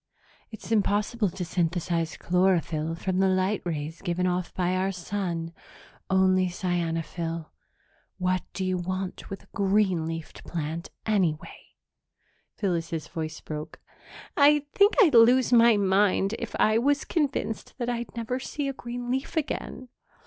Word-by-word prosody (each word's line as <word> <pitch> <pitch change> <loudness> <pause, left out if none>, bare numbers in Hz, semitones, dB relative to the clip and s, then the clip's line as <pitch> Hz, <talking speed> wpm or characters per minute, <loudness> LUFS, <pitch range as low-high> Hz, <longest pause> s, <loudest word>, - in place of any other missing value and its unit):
It's 220 0 -10
impossible 210 0 +1
to 180 0 -5
synthesize 170 -1 -1
chlorophyll 170 -3 +1
from 185 +2 -2
the 190 - +4
light 185 +2 +1
rays 160 -1 -4
given 180 -1 -1
off 180 0 -1
by 180 0 +1
our 190 +1 0
sun 175 -3 -3 0.6
only 185 -1 +4
cyanophyll. 165 -2 -3 0.7
What 185 -1 +1
do 190 - -2
you 185 -1 0
want 185 +1 -4
with 195 - -7
a - - -25
green 195 -5 +2
leafed 165 -1 -6
plant, 165 0 -4 0.2
anyway?" 185 -8 -1 0.8
Phyllis's 165 -5 -2
voice 160 -2 -5
broke. 155 +1 -7 0.6
"I 290 0 +5
think 405 +2 +5
I'd 325 - +4
lose 245 +2 +6
my 235 -2 +7
mind 195 0 +2
if - - -5
I 215 +1 +4
was 280 +3 +1
convinced 285 -8 -2
that 240 -3 -3
I'd 240 0 -3
never 235 +2 -2
see 280 +2 -4
a 275 - -2
green 245 -1 -5
leaf 265 +5 -2
again. 260 -4 -3
185 Hz, 140 wpm, -27 LUFS, 170-225 Hz, 0.8 s, my